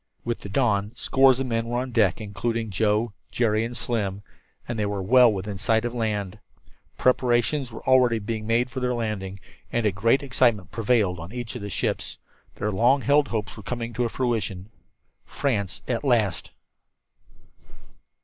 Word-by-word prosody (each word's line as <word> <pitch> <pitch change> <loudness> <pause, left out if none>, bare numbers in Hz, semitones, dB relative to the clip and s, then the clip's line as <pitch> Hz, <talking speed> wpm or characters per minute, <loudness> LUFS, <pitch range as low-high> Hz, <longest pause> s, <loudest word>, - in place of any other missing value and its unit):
With 120 0 -2
the 100 - -9
dawn, 105 -2 +1
scores 135 -1 +4
of 135 - -1
the 120 - -3
men 115 0 0
were 120 +1 -1
on 130 0 -4
deck, 110 -5 +2
including 110 +1 -3
Joe, 105 +2 +1 0.2
Jerry 110 -2 +1
and 120 +1 -5
Slim 100 -4 -2 0.4
and 120 -2 -3
they 105 - +1
were 100 -1 -3
well 125 +3 +6
within 100 0 -4
sight 110 +3 +2
of 120 - -2
land. 105 -4 -2 0.6
Preparations 125 +1 +2
already 125 0 +3
were 105 - -7
being 110 -1 -3
made 120 +2 +1
for 130 - -4
their 125 -1 0
landing, 100 -4 -3 0.3
and 120 -1 0
a 105 - +3
great 115 +8 +2
excitement 120 - +1
prevailed 105 -6 +1
on 85 +3 -8
each 120 -1 -5
of 125 - -5
the 100 - -5
ships. - - -2 0.4
Their 105 +1 -2
long 120 +8 +3
held 145 +1 +3
hopes 110 -3 -3
were 110 - -9
coming 115 +2 -4
to 120 -1 0
fruition. 110 -6 -2 0.6
France 105 -9 -2
at 120 +1 -1
last! 110 - +1
115 Hz, 170 wpm, -25 LUFS, 105-125 Hz, 0.6 s, well